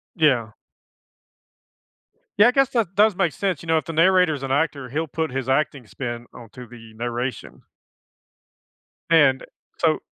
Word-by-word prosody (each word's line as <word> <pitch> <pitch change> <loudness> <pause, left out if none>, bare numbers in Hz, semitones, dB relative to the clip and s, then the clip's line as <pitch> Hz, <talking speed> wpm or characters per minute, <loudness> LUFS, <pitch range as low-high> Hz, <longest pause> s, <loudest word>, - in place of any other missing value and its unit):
Yeah. 130 -9 +2 1.9
Yeah, 210 - +7
I - - +4
guess 270 0 +2
that 220 -8 -1
does 210 0 +4
make 175 -4 0
sense, 190 -6 -2
you 165 - -12
know, 160 0 +3
if 155 - -2
the 165 - -6
narrator's 165 -3 +3
an 135 - -4
actor, 140 -2 -1
he'll 160 +6 -2
put 160 +2 -3
his 130 0 -4
acting 135 -2 0
spin 120 +2 -6
onto 120 +2 -12
the 115 -1 -14
narration. 120 +3 -5 1.5
And, 145 -5 +4 0.3
so - - +1
145 Hz, 150 wpm, -22 LUFS, 125-170 Hz, 1.9 s, Yeah